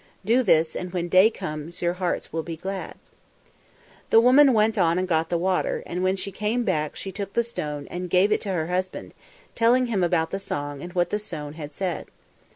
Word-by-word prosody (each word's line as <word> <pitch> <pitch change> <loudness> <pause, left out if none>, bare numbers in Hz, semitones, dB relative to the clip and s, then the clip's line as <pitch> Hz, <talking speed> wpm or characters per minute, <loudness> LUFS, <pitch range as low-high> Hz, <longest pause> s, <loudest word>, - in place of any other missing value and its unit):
Do 235 +5 +4
this, 165 -7 +3
and 180 -1 -4
when 175 -1 -2
day 185 +4 +6
comes 155 -3 -6
your 175 0 +2
hearts 180 -1 -3
will 165 - -1
be 165 0 -7
glad." 190 +3 -5 1.1
The 225 - +7
woman 265 +4 +6
went 220 -1 +3
on 170 -1 +3
and 185 0 0
got 160 -2 +1
the 175 - +1
water, 185 +2 0
and 180 +1 -4
when 185 +1 +2
she 195 +1 -3
came 215 +5 -1
back 155 -8 -1
she 195 - -6
took 200 +1 -6
the 235 - +2
stone 150 -11 -5
and 180 0 -4
gave 185 +4 +3
it - - +2
to 200 - -3
her 160 -3 -1
husband, 185 +2 -3 0.4
telling 240 +2 +3
him 215 -6 0
about 165 -2 +1
the 195 - -2
song 145 -7 -4
and 175 - -7
what 175 -1 +1
the 210 - 0
stone 150 -8 -6
had 150 -2 -8
said. 180 +3 -3
180 Hz, 215 wpm, -25 LUFS, 165-205 Hz, 1.1 s, The